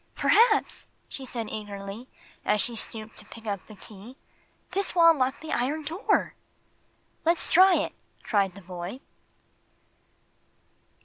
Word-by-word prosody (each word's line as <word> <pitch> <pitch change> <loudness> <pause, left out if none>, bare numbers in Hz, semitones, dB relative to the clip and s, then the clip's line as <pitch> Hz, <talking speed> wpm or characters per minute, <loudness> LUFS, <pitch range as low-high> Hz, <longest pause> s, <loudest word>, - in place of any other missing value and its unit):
"Perhaps," 435 0 +3 0.2
she 270 - -7
said, 230 -4 -4
eagerly, 205 +2 -7 0.4
as 210 - +2
she 235 +3 -1
stooped 220 0 -5
to 210 - -10
pick 225 +1 -13
up 200 -3 -4
the 215 - -12
key, 215 +6 -13 0.5
"this 390 0 -1
will 335 -1 +8
unlock 265 -3 0
the 315 - -7
iron 285 +6 0
door." 330 +7 0 0.9
"Let's 335 +1 +2
try 370 +1 +8
it!" - - -1 0.3
cried 195 -4 +1
the 200 - -11
boy. 180 +6 -6
235 Hz, 130 wpm, -27 LUFS, 205-320 Hz, 0.9 s, will